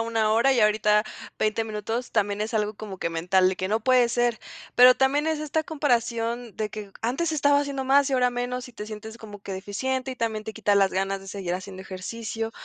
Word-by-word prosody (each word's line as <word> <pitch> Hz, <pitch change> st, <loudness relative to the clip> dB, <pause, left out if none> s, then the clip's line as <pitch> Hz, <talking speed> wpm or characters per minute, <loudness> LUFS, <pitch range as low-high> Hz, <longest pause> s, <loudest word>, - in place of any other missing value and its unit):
1 225 Hz, -1 st, +1 dB
hora, 235 Hz, +5 st, +4 dB
y 240 Hz, -, +2 dB
ahorita 210 Hz, 0 st, +3 dB, 0.3 s
20 215 Hz, +1 st, +1 dB
minutos, 225 Hz, +2 st, -4 dB
también 205 Hz, -1 st, 0 dB
es 215 Hz, +2 st, -3 dB
algo 210 Hz, -1 st, 0 dB
como 205 Hz, -2 st, -8 dB
que 170 Hz, -, -2 dB
mental, 180 Hz, +3 st, +2 dB
de 190 Hz, -, -4 dB
que 185 Hz, -, -3 dB
no 220 Hz, +2 st, +1 dB
puede 250 Hz, 0 st, +4 dB
ser. 240 Hz, -1 st, +1 dB, 0.4 s
Pero 250 Hz, +1 st, +9 dB
también 275 Hz, +4 st, +2 dB
es 315 Hz, -1 st, 0 dB
esta 305 Hz, +1 st, -1 dB
comparación 240 Hz, -6 st, -1 dB
de 215 Hz, -1 st, -2 dB
que 210 Hz, -2 st, -8 dB
antes 275 Hz, +9 st, 0 dB
estaba 285 Hz, -1 st, +3 dB
haciendo 280 Hz, -2 st, -3 dB
más, 275 Hz, +1 st, +4 dB
y 275 Hz, -, 0 dB
ahora 250 Hz, -1 st, +3 dB
menos. 245 Hz, +1 st, -3 dB
Y -, -, -14 dB
te 210 Hz, -2 st, -7 dB
sientes 220 Hz, +1 st, -8 dB
como 205 Hz, -2 st, -10 dB
que 195 Hz, -, -6 dB
deficiente, 255 Hz, +8 st, -3 dB
y 255 Hz, -, -6 dB
también 220 Hz, -3 st, -2 dB
te 220 Hz, -, -6 dB
quita 210 Hz, -2 st, +1 dB
las 195 Hz, -1 st, +4 dB
ganas 195 Hz, +1 st, -1 dB
de 195 Hz, -, -12 dB
seguir 190 Hz, -2 st, -4 dB
haciendo 190 Hz, +1 st, -7 dB
ejercicio. 225 Hz, +4 st, -5 dB
225 Hz, 225 wpm, -25 LUFS, 205-250 Hz, 0.4 s, Pero